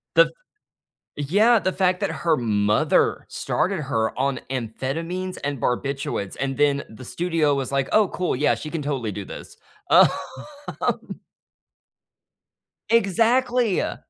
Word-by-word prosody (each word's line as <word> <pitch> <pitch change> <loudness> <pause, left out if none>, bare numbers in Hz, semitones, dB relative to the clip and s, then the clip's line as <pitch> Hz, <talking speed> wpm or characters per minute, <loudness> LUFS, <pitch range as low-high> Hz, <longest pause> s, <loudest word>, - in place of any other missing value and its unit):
The - - +6 0.9
yeah, 205 - +4
the 190 -2 -1
fact 185 -1 +1
that 200 - 0
her 165 -2 +1
mother 105 -3 +1
started 190 -3 -1
her 110 -5 -1
on 135 -1 0
amphetamines 160 +10 -4
and 140 -2 -3
barbiturates, 130 -5 -2
and 135 0 -2
then 140 -1 +2
the 120 +4 -12
studio 165 -2 0
was 135 0 -3
like, 135 -1 0
"Oh, 215 -2 +4
cool, 180 -8 -2
yeah, 145 - +2
she 155 - -7
can 160 -2 -3
totally 130 -7 -2
do 100 +1 -6
this." - - -10 0.3
Um - - +8 2.8
Exactly, 230 +1 +2
uh! - - -3
145 Hz, 130 wpm, -23 LUFS, 130-185 Hz, 2.8 s, Um